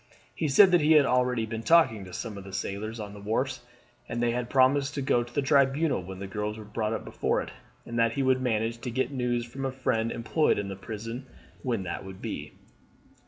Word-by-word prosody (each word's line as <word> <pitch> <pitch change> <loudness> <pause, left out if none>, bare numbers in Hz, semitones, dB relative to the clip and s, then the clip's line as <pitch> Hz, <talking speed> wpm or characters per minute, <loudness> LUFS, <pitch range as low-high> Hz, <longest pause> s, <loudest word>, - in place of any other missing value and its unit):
He 160 - -1
said 185 +7 +7
that 175 -2 +5
he 155 +2 +5
had 150 -3 +6
already 125 -2 +2
been 110 0 -5
talking 120 - +4
to 90 - -11
some 110 +3 -5
of 100 - -8
the 95 0 -11
sailors 110 +4 -4
on 105 -1 -6
the 105 - -10
wharves, 105 +2 -1 0.5
and 120 - -3
that 120 - +2
they 120 - +2
had 120 0 -2
promised 135 +2 +3
to 140 - -1
go 120 -2 +3
to 120 0 -7
the 140 +3 0
Tribunal 140 - +3
when 95 +1 -8
the 100 - -6
girls 105 +2 -3
were 110 - -9
brought 105 +1 -2
up - - -4
before - - 0
it, - - -5 0.3
and 120 0 -3
that 115 0 +3
he 140 - 0
would 130 0 +3
manage 115 -1 0
to 125 - -4
get 130 +2 -1
news 120 -3 -1
from 135 +3 -7
a 135 - -1
friend 115 -3 0
employed 150 +7 +1
in 100 -1 -3
the 95 - -5
prison 115 +6 -7 0.3
when 115 -6 -1
that 90 - -4
would 95 0 -9
be. - - -5
120 Hz, 240 wpm, -28 LUFS, 105-130 Hz, 0.5 s, said